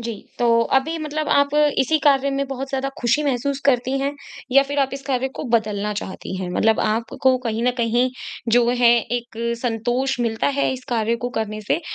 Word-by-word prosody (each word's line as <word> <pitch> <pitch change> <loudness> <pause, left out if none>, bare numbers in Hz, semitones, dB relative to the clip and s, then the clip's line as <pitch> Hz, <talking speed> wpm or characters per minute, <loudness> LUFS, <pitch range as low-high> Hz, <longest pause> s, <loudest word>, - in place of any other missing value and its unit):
जी, 230 0 -4 0.3
तो 230 -1 +4 0.2
अभी 320 +5 -4
मतलब 305 0 -3
आप 285 0 +3 0.2
इसी 310 +4 +2
कार्य 280 -1 +4
में 275 0 -1
बहुत 270 0 -5
ज़्यादा 270 0 -2
खुशी 245 +5 +2
महसूस 275 0 -1
करती 260 0 +2
हैं 280 +1 -1 0.4
या 275 +1 +7
फिर 285 - -1
आप 270 - +1
इस 275 - -7
कार्य 265 -1 0
को - - -3
बदलना 210 -2 0
चाहती 190 -1 -6
हैं? 185 -1 -4
मतलब 220 +4 +2
आपको 230 +4 +1
कहीं 230 -2 -3
न 250 - +4
कहीं 240 +2 +2 0.4
जो 240 0 +4
है 245 -1 +4 0.3
एक 235 -1 -13 0.2
संतोष 245 +3 -1
मिलता 225 -1 0
है 280 - +2
इस 255 -1 -7
कार्य 230 -1 0
को - - 0
करने 215 -1 -3
से 270 - 0
250 Hz, 195 wpm, -21 LUFS, 230-275 Hz, 0.4 s, या